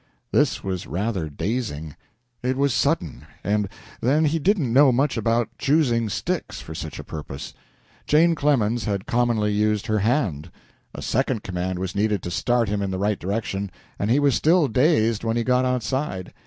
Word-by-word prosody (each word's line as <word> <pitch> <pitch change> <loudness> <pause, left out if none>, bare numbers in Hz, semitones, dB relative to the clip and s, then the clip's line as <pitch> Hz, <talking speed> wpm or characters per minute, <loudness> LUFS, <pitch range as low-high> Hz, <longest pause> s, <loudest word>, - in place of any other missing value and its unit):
This - - +2
was 95 -2 -3
rather 90 - -2
dazing. 80 - -3 0.5
It 130 +1 -1
was 140 -2 +2
sudden, 80 - 0 0.2
and, 105 0 0 0.3
then, 145 +6 +3
he 160 +2 +1
did 200 +7 +3
not 140 -9 -1
know 135 +3 +6
much 135 +3 +1
about 115 0 0
choosing 125 -6 +2
sticks 95 -5 -3
for 80 - -8
such - - -6
a - - -7
purpose. 70 -3 -7 0.5
Jane 165 +3 +5
Clemens 120 -7 +1
had 100 -2 -2
commonly 115 -3 +1
used 105 0 +1
her 110 0 +1
hand. 100 - 0 0.5
A - - -6
second 130 -3 0
command 90 0 -3
was 95 0 -3
needed 105 -2 0
to 90 - -4
start 120 +5 +1
him 100 0 -1
in 100 - -1
the 95 - -2
right 100 +1 0
direction, 100 0 -2 0.3
and 100 - -1
he 130 +5 +4
was 140 -2 +3
still 160 +4 +4
dazed 115 -4 +2
when 115 0 0
he 120 - +1
got 125 +1 +2
outside. 125 -4 -2
110 Hz, 180 wpm, -23 LUFS, 100-130 Hz, 0.5 s, know